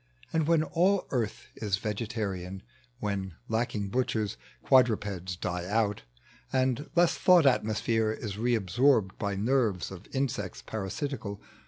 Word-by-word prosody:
And 160 -2 +2
when 165 -2 +4
all 185 +5 +2
Earth 120 -2 -2
is 100 -4 -1
vegetarian 100 -4 -3 0.2
— 125 -1 -35
When, 95 -4 -2
lacking 110 -3 -1
hutchers, 110 - 0 0.3
quadrupeds 105 -8 +2
die 90 0 -3
out, 105 0 +1 0.5
And 130 +2 0
less 175 -1 +5
Thought 180 -4 +5
atmosphere 110 -3 +2
is 110 -2 -5
re 120 +2 +2
aleorbed 110 +1 +2
By 100 -1 -1
neri'es 110 -4 +1
of 95 -3 -10
insects 130 -8 -2
parasitical. 110 +1 -4
110 Hz, 130 wpm, -29 LUFS, 100-130 Hz, 0.5 s, less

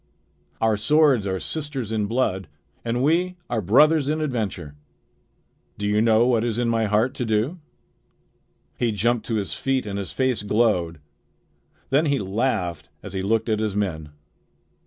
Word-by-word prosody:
Our 110 -1 +2
swords 135 -1 +3
are 95 -1 -1
sisters 145 - -4
in 105 -2 0
blood, 100 -6 -1 0.4
and 120 +2 -1
we 180 +5 +1
are 115 - 0
brothers 145 - +4
in 155 +1 0
adventure. 105 - -3 1.0
Do 105 - -4
you 105 +1 +2
know 115 0 +4
what 120 -3 +2
is 115 -2 -1
in 120 -1 0
my 115 -1 +1
heart 105 +4 +1
to - - -3
do?" 115 +10 0 1.2
He 120 -2 +1
jumped 110 +2 0
to 115 - -1
his 100 -3 -2
feet, 135 -2 -1
and 100 -1 -4
his 95 -6 -5
face 130 - 0
glowed. 105 -7 +1 0.9
Then 150 +4 +3
he 140 -1 +2
laughed 100 - -2
as - - -8
he 95 - -2
looked 110 +4 0
at 110 -2 +1
his 110 -2 -2
men. 85 -7 -2
110 Hz, 160 wpm, -23 LUFS, 100-130 Hz, 1.2 s, brothers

